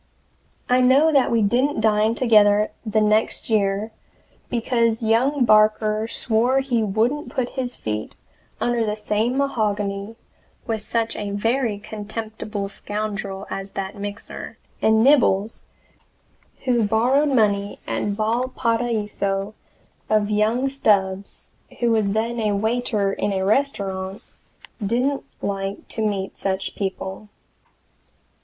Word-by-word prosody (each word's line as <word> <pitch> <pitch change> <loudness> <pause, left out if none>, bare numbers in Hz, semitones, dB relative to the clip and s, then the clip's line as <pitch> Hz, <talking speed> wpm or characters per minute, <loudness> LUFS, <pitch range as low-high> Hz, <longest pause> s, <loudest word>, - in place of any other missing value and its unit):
I 250 +1 +4
know 270 +5 +5
that 275 -3 +4
we 230 -2 +2
didn't 250 +7 +1
dine 215 +1 +2
together 210 -3 +4
the 215 -1 +1
next 215 +2 +1
year, 205 +1 +1 0.6
because 230 -1 +1
young 250 +5 +2
Barker 215 0 +3
swore 240 +3 +1
he 250 -4 0
wouldn't 225 +9 0
put 250 -2 -2
his 255 -2 -4
feet 105 0 -4 0.4
under 240 -1 +1
the 210 -1 -1
same 215 +4 -1
mahogany 210 -5 -1 0.5
with 220 -2 -2
such 230 +1 -1
a 205 -1 -4
very 225 +2 0
contemptible 215 0 -5
scoundrel 200 -1 -4
as 195 0 -4
that 195 +1 -3
Mixer; 205 +1 -7 0.2
and 220 0 +4
Nibbles, 230 -6 +3 1.0
who 245 -2 +2
borrowed 245 +8 +2
money 205 -6 +1
at - - -2
Valparaiso 220 -2 -1 0.6
of 215 -1 +2
young 220 +5 +2
Stubbs, 200 -7 0 0.3
who 240 -1 +2
was 215 -3 +2
then 230 +2 -1
a 210 -2 +1
waiter 220 -2 0
in 205 - -1
a 190 -1 -1
restaurant, 195 -5 -1 0.6
didn't 250 +7 0 0.2
like 195 0 -3
to 220 - -3
meet 195 -2 -2
such 195 0 -2
people. 190 +1 -5
215 Hz, 120 wpm, -22 LUFS, 205-240 Hz, 1.0 s, know